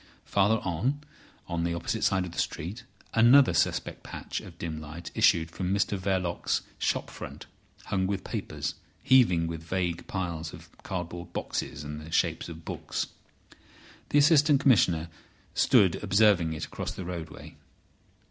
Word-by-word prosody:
Farther 100 +3 +3
on, 95 - -1 0.5
on 85 -1 -2
the 85 0 0
opposite 105 +7 -2
side 95 -2 +2
of 90 - -7
the - - -5
street, 105 +11 -3 0.3
another 120 +4 +6
suspect - - 0
patch - - -6
of 85 - -12
dim 80 -2 -5
light 80 +3 -8
issued 80 0 +3
from 90 +1 -3
Mr 100 +1 +1
Verloc's 95 -2 0 0.2
shop - - 0
front, - - -8 0.4
hung 95 -1 0
with 100 0 -2
papers, - - -4 0.3
heaving 100 -11 +5
with 80 -1 -4
vague 85 0 -2
piles 85 -4 -3
of - - -12
cardboard 85 -1 -5
boxes 70 - -3
and 75 +1 -6
the 75 - -10
shapes - - +1
of 80 -1 -10
books. - - -3 1.0
The - - +3
Assistant 145 -1 +6
Commissioner 90 - +4 0.5
stood 105 -10 +4
observing 100 -5 +4
it 80 - -4
across - - -5
the 95 - -7
roadway. 85 -3 -7
90 Hz, 150 wpm, -28 LUFS, 85-105 Hz, 1.0 s, another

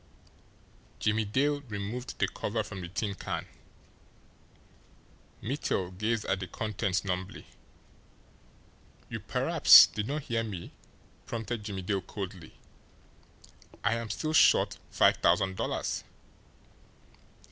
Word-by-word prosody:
Jimmie 110 0 +1
Dale 145 +7 +1
removed 105 +5 -5
the - - +2
cover - - -3
from 95 - -8
the 90 - -5
tin 100 +3 -3
can. 95 - -4 2.0
Mittel 95 -7 -2
gazed 110 +2 -1
at 95 0 0
the 95 - -5
contents 100 -2 -2
numbly. 95 0 -4 1.6
"You - - -4
perhaps - - +7
did 105 0 -4
not 145 +1 -3
hear 115 -3 -1
me?" 95 -6 -6 0.6
prompted 115 -1 -4
Jimmie 100 -3 -5
Dale 95 +1 -1
coldly. 95 -4 -8 1.3
"I 110 - +2
am 115 -1 -3
still 155 +9 -2
short - - +4
five - - +4
thousand 95 -1 +2
dollars." - - -2
105 Hz, 110 wpm, -29 LUFS, 95-115 Hz, 2.0 s, perhaps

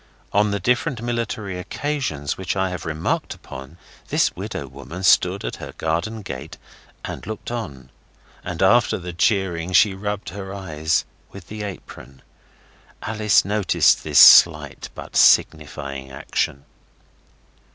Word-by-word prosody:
On 105 +1 +3
the 100 0 -1
different 125 - 0
military 110 -5 -3
occasions 105 - -3
which 95 -1 -3
I 95 -1 0
have 90 -3 -6
remarked 80 +1 -2
upon 70 +5 -11 0.3
this - - +1
widow 70 - -5
woman 70 +8 -9
stood 90 +1 +3
at - - -4
her - - -9
garden 95 +8 -2
gate 75 -3 -8 0.5
and - - -7
looked 110 +2 -6
on. 70 - -6 0.5
And - - -3
after - - +4
the 90 -1 -7
cheering 90 -2 0
she 100 +1 +5
rubbed 105 +1 -4
her 95 +1 -7
eyes 80 -4 -1 0.2
with 100 -2 -13
her 105 -1 -5
apron. 70 -8 -11 0.8
Alice 105 -2 +2
noticed 105 -2 +2
this - - -1
slight 75 -4 +7
but - - -10
signifying 70 -3 +2
action. 70 +1 -3
90 Hz, 130 wpm, -22 LUFS, 75-105 Hz, 0.8 s, slight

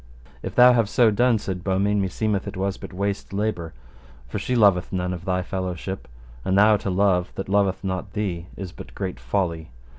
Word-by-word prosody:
If - - -6
thou 125 0 +8
have 115 -4 +2
so 115 -1 +4
done, 120 +2 +3
said 95 -3 -5
Beaumains, 100 +2 +1
meseemeth 100 +1 -1
it 100 -1 -6
was 95 +1 -1
but - - -9
waste 100 +1 -3
labour, 100 -5 -2 0.6
for - - -4
she 125 - -1
loveth 100 -6 +4
none 90 -1 -1
of 85 -1 -7
thy 90 -1 0
fellowship, 95 +1 -4 0.4
and 95 +1 +1
thou 105 +1 +6
to 100 - -4
love 90 -1 +2
that 95 - -4
loveth 100 -1 +1
not 95 0 -3
thee 90 -5 -3
is 95 -3 -6
but - - -11
great 95 -8 -4
folly. 80 +6 -2
95 Hz, 190 wpm, -24 LUFS, 90-105 Hz, 0.6 s, thou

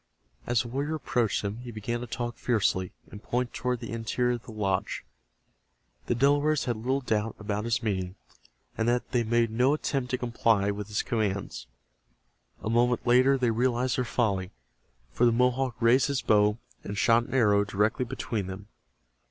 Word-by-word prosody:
As 120 -1 +2
the - - -8
warrior 140 +6 -2
approached 120 -9 0
them 100 +2 -3
he 125 0 -8
began 120 +1 -3
to 125 - -6
talk 120 0 -4
fiercely, 100 -7 0 0.2
and 105 - -9
point 125 +1 -2
toward 125 +1 -2
the - - -6
interior 115 +2 0
of - - -15
the - - -8
lodge. 95 -3 -2 1.0
The - - +1
Delawares 145 +4 +2
had 120 -2 0
little 130 +5 -1
doubt 110 -3 -1
about 105 0 -3
his 115 0 0
meaning, 95 -4 -2 0.6
and 115 - -1
yet 120 +1 0
they 120 -2 +2
made 115 0 +1
no 125 +6 +3
attempt 135 -4 -2
to 125 - 0
comply 115 -4 +1
with 100 0 -5
his 105 0 -1
commands. 100 - -2 1.0
A - - -3
moment 120 +1 +2
later 130 +3 +5
they 125 -3 +1
realized 125 +1 +1
their - - +2
folly, 100 -6 0 0.6
for 115 - -1
the 120 - +6
Mohawk 125 +1 +1
raised 125 +4 +4
his 140 -2 -1
bow 105 0 +3 0.3
and 100 - -5
shot 115 +2 +4
an - - -5
arrow 105 -5 +4
directly 105 +4 0
between 115 -5 -3
them. 95 +2 -8
120 Hz, 175 wpm, -28 LUFS, 105-125 Hz, 1.0 s, the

